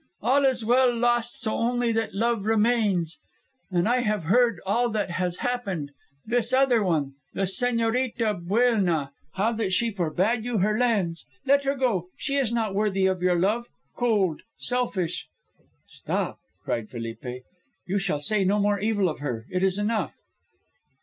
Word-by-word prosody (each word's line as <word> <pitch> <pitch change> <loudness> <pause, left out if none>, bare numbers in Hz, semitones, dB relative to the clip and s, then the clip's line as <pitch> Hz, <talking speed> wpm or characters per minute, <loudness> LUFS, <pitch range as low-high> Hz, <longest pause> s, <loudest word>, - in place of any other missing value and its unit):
All 270 +5 +3
is 255 -4 +1
well 250 +2 +4
lost 240 0 +1
so 220 -2 -1
only 240 0 +1
that 225 -3 -1
love 225 -1 0
remains.' 210 -7 +2 0.5
And 175 0 +1
I 245 +2 +3
have 215 -6 0
heard 230 +3 +3
all 235 +5 +2
that 210 -4 -2
has 180 0 -1
happened 195 -12 -2 0.3
this 235 +1 0
other 260 -3 +4
one, 155 -7 0 0.2
the 195 - 0
Señorita 230 -1 0
Buelna, 190 - +2 0.2
how 205 +4 +1
that 220 -4 -2
she 230 +5 +2
for 180 -6 -1
bade 215 +8 +1
you 240 -1 -1
her 210 +2 +2
lands. 205 -9 0 0.2
Let 280 0 +3
her 275 +1 +1
go; 230 -10 0
she 275 - -2
is 260 -5 +1
not 225 -4 0
worthy 195 -2 +1
of 190 -1 +1
your 180 -1 +3
love, 215 +7 +1 0.3
cold, 205 -10 +1 0.2
selfish 210 -9 -2 0.3
" - - -40 0.3
"Stop!" - - -3 0.2
cried 110 -2 -2
Felipe, 125 +2 -6 0.4
"you 195 +2 0
shall 180 -6 -1
say 210 +5 +1
no 195 +2 +2
more 205 0 +2
evil 205 -2 +1
of 155 - -3
her. 120 -6 -4
It 185 - 0
is 190 0 +2
enough." 215 +1 -1
215 Hz, 165 wpm, -26 LUFS, 185-240 Hz, 0.5 s, well